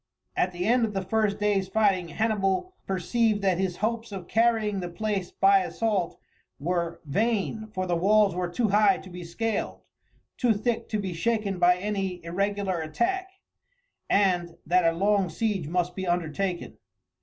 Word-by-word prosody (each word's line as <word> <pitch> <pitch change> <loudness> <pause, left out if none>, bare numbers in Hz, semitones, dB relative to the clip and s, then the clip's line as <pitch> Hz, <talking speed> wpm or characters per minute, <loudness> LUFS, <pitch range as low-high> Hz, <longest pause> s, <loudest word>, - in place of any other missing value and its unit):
At 180 - +1
the 175 0 -3
end 240 +3 +3
of 215 -2 -1
the 195 - -1
first 210 +1 +1
day's 205 -2 +1
fighting 195 -3 +2
Hannibal 210 - 0
perceived 205 +3 +1
that 185 -2 +2
his 185 -2 -1
hopes 230 0 -3
of 190 -3 -7
carrying 220 -3 +2
the 175 -1 -4
place 200 0 -2
by 195 0 +4
assault 195 -2 -1 0.4
were 170 +2 -2
vain 220 +6 -1
for 185 -4 -3
the 175 -1 0
walls 200 +2 +4
were 180 0 -2
too 215 +5 0
high 210 +5 +4
to 190 - -11
be 180 0 -7
scaled, 210 +5 -3 0.5
too 245 -3 +3
thick 230 +3 -2
to 215 - 0
be 190 -3 -3
shaken 205 +1 -1
by 180 0 +5
any 195 -2 -2
irregular 195 0 -1
attack 370 - -1 0.8
and 180 -4 +2
that 175 0 +3
a 165 - -7
long 200 -1 +2
siege 195 -2 -1
must 180 +2 -1
be 190 -1 -4
undertaken. 175 +1 -2
195 Hz, 165 wpm, -27 LUFS, 180-215 Hz, 0.8 s, by